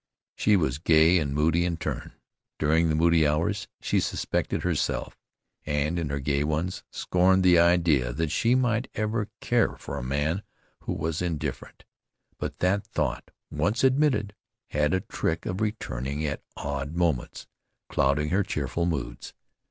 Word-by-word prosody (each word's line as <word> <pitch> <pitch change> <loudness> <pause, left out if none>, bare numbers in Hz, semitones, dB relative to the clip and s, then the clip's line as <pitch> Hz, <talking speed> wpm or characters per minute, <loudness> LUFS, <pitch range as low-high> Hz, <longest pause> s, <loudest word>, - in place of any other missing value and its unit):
She 105 - +3
was 75 -6 0
gay 80 +2 +5
and 75 -3 -2
moody 80 +4 +2
in 85 -1 -1
turn. 75 -5 -4 0.4
During 80 +2 +2
the 75 - +1
moody 80 -1 +4
hours 85 +7 0
she - - +1
suspected - - -1
herself, - - -1 0.5
and 75 +3 0
in 80 -3 -2
her 70 0 -2
gay 70 +1 0
ones, 80 +4 -2
scorned 95 +1 +2
the 90 -2 +6
idea 85 -7 +3
that 80 +3 -2
she 115 +9 +2
might 125 -1 +1
ever 110 0 -1
care - - +2
for - - -6
a - - -6
man 75 +8 -1 0.4
who - - -1
was 80 +1 -2
indifferent. 85 -4 -4 0.5
But - - -4
that 95 +3 +2
thought - - -2 0.2
once 85 - 0
admitted, 130 -6 +2 0.4
had 75 +3 +1
a 95 - 0
trick 80 -1 -2
of 90 +3 -3
returning 75 - -2
at 75 - -3 0.2
odd 70 +2 -4
moments, 85 -8 -1 0.4
clouding 70 +2 +1
her 95 +5 +2
cheerful 85 -1 -2
moods. 75 -7 -4
80 Hz, 150 wpm, -27 LUFS, 75-95 Hz, 0.5 s, the